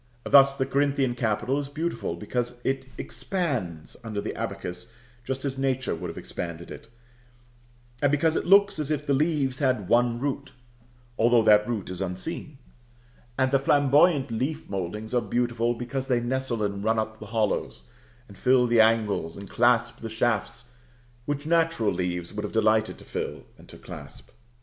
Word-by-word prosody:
Thus 140 0 +6
the 130 - +1
Corinthian 140 -2 +1
capital 120 +3 0
is 140 -1 -5
beautiful, 155 - -3
because 120 +6 -3
it 135 0 -1
expands 125 - -3
under 110 -3 -4
the - - -3
abacus 100 +6 -5 0.3
just 130 +2 -4
as 135 -1 -3
Nature 130 -1 0
would - - -5
have - - -8
expanded 85 -1 -6
it; - - -10 1.1
and 145 - +3
because 155 +2 +2
it - - -1
looks 200 -2 +5
as 150 -2 -2
if 150 -1 -1
the 140 - +1
leaves 140 -3 +1
had 130 -9 +1
one 120 +1 +3
root, 140 0 -3 0.7
though 120 0 +5
that 105 -1 +5
root 105 -6 -3
is 90 0 -5
unseen. 95 - -5 0.8
And 130 -1 +2
the 135 - +4
flamboyant 145 +1 +4
leaf 135 +8 -2
mouldings 100 +4 -4
are 120 - +3
beautiful, 120 -1 0
because 125 +3 -4
they 125 -3 +2
nestle 120 -2 -2
and 100 -1 -2
run 110 +1 +2
up 110 0 -2
the 110 - -9
hollows, 105 - -1 0.4
and 100 - -14
fill 125 +4 +3
the 120 -1 +5
angles, 110 -7 +1
and 100 0 -8
clasp 120 +1 +2
the 115 - -6
shafts 115 +1 -1 0.6
which 145 0 -2
natural 165 -8 +2
leaves 90 -1 -3
would 105 0 -4
have 105 - -5
delighted 110 0 +2
to - - -15
fill - - -5
and - - -18
to - - -12
clasp. - - -11
120 Hz, 170 wpm, -26 LUFS, 110-140 Hz, 1.1 s, Thus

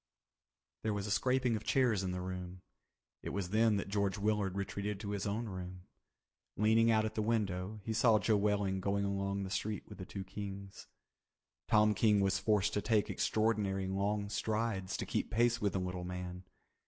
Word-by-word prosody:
There 110 -1 -1
was 100 -1 -2
a 105 - -3
scraping 125 +1 +2
of 110 - -4
chairs 120 -7 +2
in 95 -1 -2
the 90 0 -3
room. 90 0 -6 0.6
It - - -5
was 95 -2 -3
then 110 -1 +4
that 100 - -3
George 100 -1 0
Willard 105 -2 0
retreated 100 +1 -3
to 100 - -4
his 100 0 -2
own 110 +4 -1
room. 90 -2 -7 0.7
Leaning 110 +2 +4
out 110 -1 +4
at 110 - -3
the 110 - -1
window 105 -2 -1
he 110 - -2
saw 115 0 +5
Joe 110 +1 +2
Welling 100 -2 +1
going 100 +1 0
along 100 0 -1
the 95 - -5
street 105 +1 -2
with - - -11
the 95 - -5
two 95 - -5
Kings. 100 0 -7 0.8
Tom 105 0 +5
King 105 0 +4
was 95 -1 +2
forced 105 -2 +2
to 105 - 0
take 110 -2 +1
extraordinary 105 -3 +1
long 100 +2 -1
strides 105 -2 -1
to - - -3
keep - - -1
pace 120 +1 +2
with 100 -1 +1
the 95 - 0
little 90 -1 -3
man. 90 0 -6
100 Hz, 190 wpm, -34 LUFS, 95-110 Hz, 0.8 s, saw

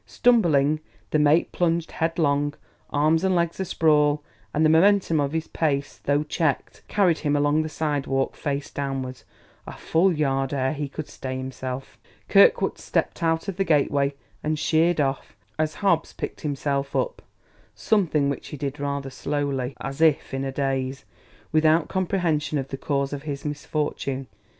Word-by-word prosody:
Stumbling, 155 - +3 0.3
the 155 - +3
mate 150 +3 +3
plunged 170 -1 0
headlong, 145 -3 0 0.3
arms 155 +4 +2
and 190 -1 +2
legs 170 0 0
a 190 - -1
sprawl; 150 -3 +3 0.3
and 155 +5 +2
the - - +5
momentum 180 -1 +4
of 140 -1 -1
his 160 -1 -2
pace, 140 -3 -1
though 145 +1 +2
checked, 150 -1 -1
carried 185 -6 +2
him 145 -1 0
along 145 +2 +3
the 155 - -3
sidewalk, 145 -3 -1
face 140 -1 -3
downwards, 135 -2 -4 0.4
a - - -6
full 180 +4 +2
yard 135 -3 0
ere 130 0 0
he 145 -1 -4
could 155 +2 -6
stay 130 -1 -5
himself. 130 0 -6 0.3
Kirkwood - - +5
stepped - - -1
out 165 +2 +1
of 195 -3 -4
the 195 - +2
gateway 140 -4 +2 0.3
and 155 +1 0
sheered 160 +2 +2
off 135 -1 -2 0.2
as 155 0 0
Hobbs 170 -5 +2
picked - - -6
himself 140 -1 -2
up; - - -1 0.5
something 165 -9 +2
which 140 - -3
he 150 - -7
did 140 +1 -4
rather 140 -1 -3
slowly, 140 -2 -2
as 135 +3 -5
if 155 -4 +3
in 135 0 -2
a 135 - -2
daze, 135 -1 -2 0.5
without 155 +1 +3
comprehension 175 -6 0
of 135 -1 -3
the - - -4
cause 140 0 -1
of 140 - -4
his 145 -1 -5
misfortune. 145 -2 -3
150 Hz, 160 wpm, -24 LUFS, 140-160 Hz, 0.5 s, the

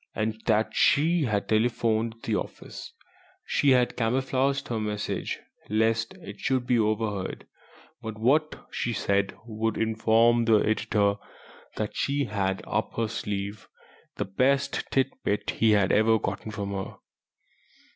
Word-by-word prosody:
And 110 0 -2
then 110 +1 +4
she 160 +2 +3
had 105 -4 -1
telephoned 110 0 +1
the - - 0
office. - - -6 0.5
She 145 - +2
had 125 -2 +3
camouflaged 130 +3 0
her 115 -2 -1
message, 105 -1 -3 0.3
lest 115 +1 +1
it 100 0 -10
should 130 -2 0
be 125 -1 +2
overheard, 105 -3 -1 0.6
but 110 -1 -6
what 150 +8 +1
she 120 - -2
had - - -3
said 100 0 0
would 110 -1 -2
inform 115 +1 +3
the 115 -1 +5
editor 105 -1 +1 0.6
that 105 -1 -3
she 140 +1 0
had 95 -3 -1
up - - -2
her 115 -1 0
sleeve 105 -2 -4 0.5
the - - -2
best 130 +8 +1
tit 135 0 +2
bit 100 0 0
he 115 - +2
had 100 -2 +3
ever 110 +1 +4
got 110 +1 -4
from 100 -1 -4
her. 95 -1 -4
110 Hz, 140 wpm, -27 LUFS, 105-120 Hz, 0.6 s, the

